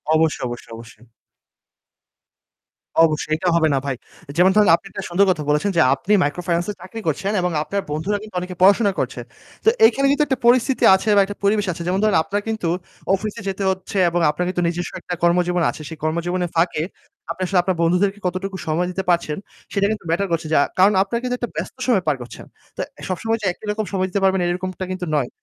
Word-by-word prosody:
অবশ্যই, 160 Hz, 0 st, +1 dB
অবশ্যই, 120 Hz, -1 st, -8 dB
অবশ্যই। 115 Hz, 0 st, -13 dB, 2.0 s
অবশ্যই 155 Hz, -1 st, -1 dB
এটা 180 Hz, -, -3 dB
হবে 165 Hz, -1 st, +4 dB
না 135 Hz, -, +2 dB
ভাই। 135 Hz, -2 st, -1 dB, 0.4 s
যেমন 180 Hz, +2 st, +5 dB
ধরেন 210 Hz, -1 st, +5 dB
আপনি -, -, -10 dB
একটা 195 Hz, -, -6 dB
সুন্দর 185 Hz, +3 st, +3 dB
কথা 160 Hz, -4 st, -2 dB
বলেছেন 150 Hz, +7 st, +2 dB
যে -, -, +6 dB
আপনি 185 Hz, +10 st, -1 dB
মাইক্রো 145 Hz, +5 st, -2 dB
ফাইন্যান্সে 175 Hz, +3 st, 0 dB
চাকরি 190 Hz, +5 st, -8 dB
করছেন 175 Hz, +6 st, -1 dB
এবং 180 Hz, 0 st, 0 dB
আপনার 200 Hz, +5 st, -2 dB
বন্ধুরা 160 Hz, +8 st, -1 dB
কিন্তু 215 Hz, -3 st, -12 dB
অনেকে 180 Hz, 0 st, -6 dB
পড়াশোনা 200 Hz, +2 st, +5 dB
করছে। -, -, -3 dB, 0.4 s
তো -, -, +8 dB, 0.2 s
এখানে 275 Hz, -9 st, 0 dB
কিন্তু 290 Hz, +1 st, +3 dB
একটা 265 Hz, -1 st, 0 dB
পরিস্থিতি 255 Hz, +2 st, +3 dB
আছে 190 Hz, +3 st, -2 dB
বা 200 Hz, -, +6 dB
একটা 205 Hz, +1 st, -8 dB
পরিবেশ 205 Hz, +1 st, +2 dB
আছে। 170 Hz, -, -7 dB
যেমন 185 Hz, +2 st, +1 dB
ধরেন 215 Hz, -4 st, +3 dB
আপনার 205 Hz, +4 st, -2 dB
কিন্তু 220 Hz, -6 st, -2 dB, 0.5 s
অফিসে 215 Hz, +2 st, -5 dB
যেতে 195 Hz, +1 st, -3 dB
হচ্ছে 190 Hz, +1 st, -3 dB
এবং 175 Hz, +1 st, 0 dB
আপনার 175 Hz, +4 st, -2 dB
কিন্তু 180 Hz, -1 st, -1 dB
নিজস্ব 175 Hz, +1 st, -3 dB
একটা 180 Hz, -, -5 dB
কর্মজীবন 175 Hz, 0 st, +2 dB
আছে। -, -, -6 dB
সেই 160 Hz, -, -8 dB
কর্মজীবনের 175 Hz, +3 st, -1 dB
ফাঁকে 165 Hz, -2 st, +1 dB, 0.5 s
আপনি 170 Hz, -, -7 dB
আসলে 185 Hz, 0 st, +2 dB
আপনার 185 Hz, -1 st, -1 dB
বন্ধুদেরকে 185 Hz, +4 st, +2 dB
কতটুকু 190 Hz, +2 st, -4 dB
সময় 165 Hz, +3 st, 0 dB
দিতে 190 Hz, +1 st, -3 dB
পারছেন 170 Hz, -3 st, +1 dB, 0.4 s
সেটা 200 Hz, 0 st, +2 dB
কিন্তু 215 Hz, -5 st, -5 dB
matter 195 Hz, +4 st, +1 dB
করছে। 165 Hz, -1 st, -1 dB
যা -, -, +5 dB, 0.2 s
কারণ 195 Hz, +3 st, +6 dB
আপনার 215 Hz, +4 st, -3 dB
কিন্তু 250 Hz, 0 st, -1 dB
একটা 240 Hz, -, -4 dB
ব্যস্ত -, -, -5 dB
সময় 215 Hz, -8 st, +3 dB
পার 150 Hz, -, +3 dB
করছেন। 120 Hz, -, -10 dB, 0.3 s
তো -, -, -2 dB, 0.3 s
সবসময় 225 Hz, +5 st, -1 dB
যে -, -, -4 dB
একই 215 Hz, -, -14 dB
রকম 215 Hz, +1 st, -2 dB
সময় 185 Hz, -1 st, 0 dB
দিতে 200 Hz, -, -1 dB
পারবেন 190 Hz, 0 st, +3 dB
এরকমটা 185 Hz, +1 st, -3 dB
কিন্তু 185 Hz, -1 st, -4 dB
নয়। 130 Hz, -4 st, -1 dB
185 Hz, 205 wpm, -21 LUFS, 170-200 Hz, 2.0 s, তো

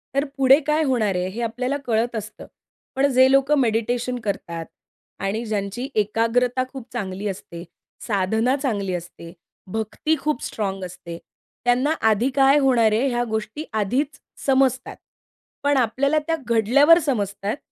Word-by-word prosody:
तर 280 Hz, +1 st, +2 dB
पुढे 270 Hz, +1 st, +6 dB
काय 305 Hz, +1 st, +2 dB
होणार 220 Hz, -7 st, +1 dB
आहे 180 Hz, 0 st, -1 dB
हे 225 Hz, +5 st, -6 dB
आपल्याला 250 Hz, +4 st, -2 dB
कळत 230 Hz, +1 st, 0 dB
असतं. 215 Hz, -1 st, -7 dB, 0.5 s
पण 270 Hz, +2 st, +3 dB
जे 260 Hz, +1 st, +5 dB
लोकं 275 Hz, +2 st, +4 dB
मेडिटेशन 245 Hz, +1 st, 0 dB
करतात. 170 Hz, -5 st, -4 dB, 0.5 s
आणि 200 Hz, +4 st, -2 dB
ज्यांची 210 Hz, +3 st, -3 dB
एकाग्रता 230 Hz, +4 st, +1 dB
खूप 265 Hz, -4 st, -9 dB
चांगली 195 Hz, +1 st, -4 dB
असते, 170 Hz, -3 st, -7 dB, 0.4 s
साधना 220 Hz, +5 st, +1 dB
चांगली 200 Hz, -9 st, -1 dB
असते, 170 Hz, -1 st, -7 dB, 0.4 s
भक्ती 220 Hz, +9 st, -1 dB
खूप 300 Hz, -3 st, -2 dB
स्ट्राँग 195 Hz, -3 st, -3 dB
असते, 170 Hz, -1 st, -9 dB, 0.5 s
त्यांना 250 Hz, +5 st, +2 dB, 0.2 s
आधी 220 Hz, +5 st, +2 dB
काय 275 Hz, +1 st, +5 dB
होणार 245 Hz, -5 st, +3 dB
आहे 230 Hz, +6 st, +2 dB
ह्या 240 Hz, -1 st, 0 dB
गोष्टी 220 Hz, +6 st, -3 dB, 0.2 s
आधीच 275 Hz, +9 st, -1 dB, 0.3 s
समजतात. 265 Hz, -2 st, +1 dB, 0.7 s
पण 285 Hz, 0 st, +2 dB
आपल्याला 270 Hz, +5 st, +2 dB
त्या 330 Hz, -, +1 dB
घडल्यावर 250 Hz, +8 st, +5 dB
समजतात 205 Hz, -4 st, -2 dB
235 Hz, 140 wpm, -22 LUFS, 205-270 Hz, 0.7 s, पुढे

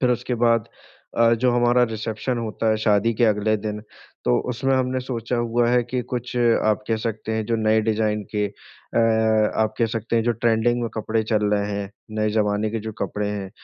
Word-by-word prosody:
फिर 125 Hz, -, +3 dB
उसके 125 Hz, +1 st, -1 dB
बाद 115 Hz, -1 st, +2 dB, 0.5 s
अ, 115 Hz, 0 st, +5 dB
जो 125 Hz, +2 st, +2 dB
हमारा 120 Hz, 0 st, +3 dB
रिसेप्शन 110 Hz, +3 st, -3 dB
होता 115 Hz, 0 st, -2 dB
है 110 Hz, -, +2 dB
शादी 105 Hz, +1 st, +3 dB
के 120 Hz, -, +2 dB
अगले 110 Hz, 0 st, +2 dB
दिन, 105 Hz, 0 st, -4 dB, 0.4 s
तो -, -, +3 dB
उसमे 135 Hz, +2 st, 0 dB
हमने 130 Hz, 0 st, 0 dB
सोचा 125 Hz, -1 st, -3 dB
हुआ 120 Hz, 0 st, +1 dB
है 125 Hz, 0 st, +3 dB
कि 125 Hz, -, 0 dB
कुछ 125 Hz, 0 st, -3 dB
आप 115 Hz, -3 st, +2 dB
कह 115 Hz, -, +2 dB
सकते 110 Hz, -1 st, -3 dB
हैं 110 Hz, 0 st, -1 dB
जो 115 Hz, 0 st, +1 dB
नए 110 Hz, 0 st, +3 dB
डिजाइन 105 Hz, -1 st, 0 dB
के 105 Hz, 0 st, +1 dB
अ, 105 Hz, +3 st, -6 dB, 0.6 s
आप 110 Hz, -, -1 dB
कह 115 Hz, -, +3 dB
सकते 115 Hz, +1 st, -2 dB
हैं 115 Hz, -, +3 dB
जो 120 Hz, -, +2 dB
ट्रेंडिंग 115 Hz, +1 st, +1 dB
में 115 Hz, -, -1 dB
कपड़े 110 Hz, 0 st, -1 dB
चल 110 Hz, -1 st, 0 dB
रहे 100 Hz, 0 st, -1 dB
हैं, 100 Hz, -1 st, -4 dB, 0.3 s
नए 105 Hz, 0 st, +1 dB
ज़माने 105 Hz, 0 st, +1 dB
के 115 Hz, 0 st, -3 dB
जो 110 Hz, -, -5 dB
कपड़े 105 Hz, +1 st, -3 dB
हैं, 100 Hz, -2 st, -5 dB
110 Hz, 205 wpm, -23 LUFS, 105-120 Hz, 0.6 s, अ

